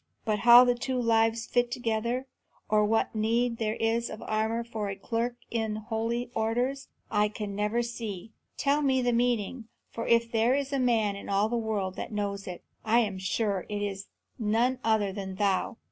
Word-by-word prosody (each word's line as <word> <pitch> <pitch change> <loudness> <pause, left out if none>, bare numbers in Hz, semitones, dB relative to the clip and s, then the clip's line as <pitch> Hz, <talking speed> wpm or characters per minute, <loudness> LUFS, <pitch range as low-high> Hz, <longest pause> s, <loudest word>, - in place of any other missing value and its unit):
But 215 -2 0
how 240 +2 +9
the 245 - +3
two 250 +1 -2
lives 225 -1 +2
fit 245 0 +1
together, 235 +1 -1 0.4
or 210 0 +3
what 225 +2 +1
need 230 +2 +1
there 220 -1 -1
is 230 +1 0
of 215 - -8
armour 220 +2 -1
for 220 -3 -4
a 195 - -4
clerk 230 +4 -2 0.2
in 220 -2 -1
holy 230 +2 -3
orders, 245 +5 -1 0.2
I 210 -1 +3
can 210 -1 -5
never 210 +4 0
see. 225 -4 -6 0.3
Tell 285 +1 +2
me 265 -3 +2
the 245 0 +2
meaning, 235 -1 0 0.2
for 230 - -5
if 230 0 +3
there 230 +3 +3
is 280 0 -2
a 275 - +1
man 225 -5 +2
in 200 - -8
all 200 +2 +2
the 240 - -1
world 210 -5 -2
that - - -5
knows 200 -1 -3
it, 180 -1 -7 0.2
I 230 +2 +4
am 200 -4 -2
sure 195 0 -1
it 205 -1 -2
is 195 -1 -4 0.3
none 235 +4 +1
other 215 -3 +2
than 190 -1 -5
thou." 200 +3 0
225 Hz, 190 wpm, -28 LUFS, 210-240 Hz, 0.4 s, how